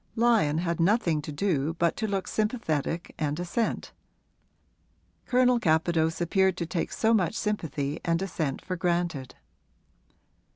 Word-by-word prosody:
Lyon 225 -10 +3
had 170 0 -1
nothing 170 -4 +2
to 150 - -6
do 155 -1 0
but 170 -1 +1
to 220 - -1
look 195 -2 -2
sympathetic 175 - -1
and 150 0 -1
assent 180 +6 -2 1.4
Colonel 250 -1 +4
Capadose 160 -2 +1
appeared 190 +2 +2
to 170 - -2
take 165 0 -2
so 225 +1 +2
much 200 -2 +2
sympathy 160 -9 -2
and 165 -1 +1
assent 160 -7 -3
for 185 - -2
granted. 170 -6 -1
170 Hz, 130 wpm, -27 LUFS, 160-205 Hz, 1.4 s, Colonel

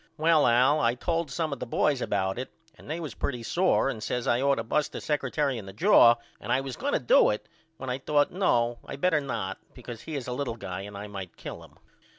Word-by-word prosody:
Well 160 -1 +4
All 120 0 +4
told 165 +3 -1
some 155 +3 -2
of 135 - -6
the 125 - -5
boys 135 +2 +1
about 95 +1 -1
it 130 - -5 0.2
and 145 - -15
they 160 +2 -3
was 160 -4 -5
pretty 125 -4 -3
sore 180 +4 +2
and 115 -5 -3
says 125 +2 -2
I 120 +2 +2
ought 140 0 +3
to 115 - -3
bust 150 +6 -1
the - - -4
secretary 140 -2 -1
in 100 - -10
the 95 - -9
jaw 115 +3 +6 0.2
and - - -5
I 130 - +3
was 135 -2 -5
going - - -2
to - - +3
do 120 - +5
it 105 0 -3 0.3
when 130 -4 -4
I 125 - -2
thought 145 +1 +2
No 120 -11 +1
I - - -7
better 155 +1 +2
not 105 -8 -4 0.2
because 120 -2 -9
he 160 - -6
is 135 -4 -4
a 125 - -2
little 125 -3 -3
guy 95 -3 -5
and 100 0 -8
I 100 - -6
might 100 -4 -8
kill - - -8
him. - - -18
125 Hz, 245 wpm, -27 LUFS, 115-145 Hz, 0.3 s, jaw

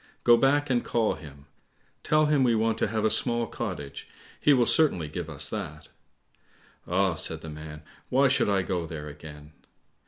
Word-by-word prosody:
Go 120 - +7
back 140 +3 +2
and 120 -1 +1
call 115 -2 0
him. 70 -3 -12 0.6
Tell 155 0 +2
him 150 -3 +2
we 120 -2 +3
want 110 0 0
to - - +1
have 110 +1 -2
a 110 - +3
small 120 -1 +2
cottage, 90 -14 -6 0.3
he 150 - +3
will 125 -4 +4
certainly 105 - +3
give 80 +1 -6
us 75 -3 0
that." - - -6 1.0
"Ah," 95 +1 +1
said 80 0 -1
the 80 - -8
man, 75 0 -9 0.3
"why 135 +2 +4
should 130 -5 +1
I 100 -2 +1
go 90 -3 -3
there 75 -2 -7
again?" 75 0 -11
100 Hz, 180 wpm, -27 LUFS, 75-120 Hz, 1.0 s, Go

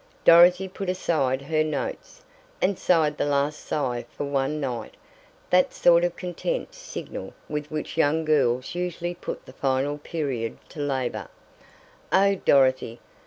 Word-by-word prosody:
Dorothy 175 +3 +7
put 190 0 -5
aside 140 -7 0
her 155 +2 +1
notes, 155 -2 -5 0.4
and 190 0 +1
sighed 155 -4 +2
the - - +1
last 145 +1 0
sigh 125 -5 -2
for - - -6
one 140 +1 -1
night 125 -5 -4 0.6
that 180 0 +3
sort 170 0 +5
of 175 -1 0
content 185 - -4
signal - - -8
with 150 0 -4
which 155 +1 -5
young 160 +1 +2
girls 130 -5 +1
usually 175 0 -3
put 175 - -7
the 130 - -13
final 135 +2 0
period 140 -8 -3
to - - -11
labor. 130 - -2 0.8
"Oh, 200 +1 +5
Dorothy!" 130 -9 +2
150 Hz, 140 wpm, -25 LUFS, 135-175 Hz, 0.8 s, Dorothy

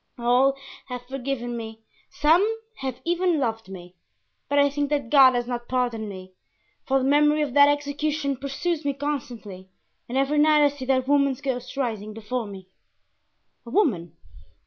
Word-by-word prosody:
All 250 +3 +3 0.3
have 250 -1 -7
forgiven 250 -2 -4
me, 225 -1 -8 0.3
some 320 +4 +3 0.4
have 265 -2 -5
even 350 0 +1
loved 225 -6 -2
me; 180 -2 -10 0.6
but 285 - +1
I 285 0 +5
think 285 0 -2
that 285 -5 -2
God 265 -3 +7
has 240 0 0
not 240 -1 -5
pardoned 240 -4 -1
me, 185 -1 -10 0.5
for 270 - +3
the 265 - 0
memory 295 +2 +3
of 280 -4 -4
that 285 0 +7
execution 290 0 -1
pursues 285 +5 -3
me 285 0 0
constantly 240 -10 -5 0.4
and 255 - -2
every 275 +2 +2
night 300 0 +5
I 290 - +5
see 280 -2 -8
that 260 -1 +1
woman's 280 -2 +2
ghost 255 -1 -4
rising 215 -5 -3
before 225 +1 -4
me." 190 -2 -10 1.0
"A 235 - -11
woman! 180 - 0
265 Hz, 165 wpm, -24 LUFS, 235-285 Hz, 1.0 s, God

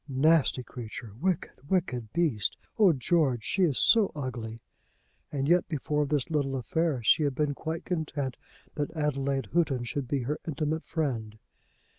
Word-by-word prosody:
"Nasty 140 -1 +3
creature! 115 -3 -8
Wicked, 175 -5 -2
wicked 130 - 0
beast! 150 - +1 0.2
Oh, 200 -4 +7
George, 135 -3 +2
she 195 - 0
is 145 -6 +1
so 220 -4 +5
ugly!" 120 -5 -5 0.7
And 140 -1 -1
yet 175 +2 +4
before 150 -1 0
this 145 0 -1
little 140 -3 0
affair, 145 0 0
she 110 - +5
had 140 -3 +1
been 150 0 +1
quite 160 +3 -5
content 145 -7 -2 0.4
that 145 -1 -2
Adelaide 140 -5 -1
Houghton 150 -7 +2
should 130 +2 -3
be 135 0 -1
her 150 +5 -2
intimate 155 +1 -2
friend. 120 -9 -2
145 Hz, 150 wpm, -29 LUFS, 130-160 Hz, 0.7 s, Oh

